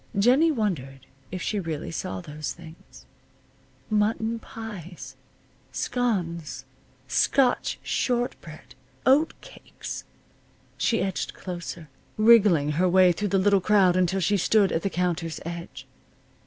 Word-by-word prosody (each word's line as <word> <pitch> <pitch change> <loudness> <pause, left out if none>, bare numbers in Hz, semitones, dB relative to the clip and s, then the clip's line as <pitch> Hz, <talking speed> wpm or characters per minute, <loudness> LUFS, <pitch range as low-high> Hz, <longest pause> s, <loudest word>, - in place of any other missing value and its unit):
Jennie 255 +10 +5
wondered 155 - -2 0.3
if 180 -1 -4
she 210 - -1
really 165 -4 -4
saw 180 +2 -4
those 155 -2 -5
things. 165 -1 -15 0.8
Mutton 220 +2 0
pies! 205 -7 -9 0.6
Scones! 170 - -2 0.4
Scotch 245 - +2
short 245 -1 0
bread! 155 -2 -12 0.3
Oat 285 +5 +4
cakes! - - -9 0.7
She 225 -2 +1
edged 190 -1 -3
closer, 175 -3 -7 0.3
wriggling 210 -10 +5
her 185 - +4
way 185 0 +6
through 205 +5 -2
the 195 0 +1
little 200 0 +3
crowd 190 -2 +4
until 185 +1 +2
she 205 +2 +2
stood 200 +1 +3
at 165 - 0
the 195 - -1
counter's 175 -3 -2
edge. 170 0 -7
185 Hz, 120 wpm, -26 LUFS, 170-220 Hz, 0.8 s, way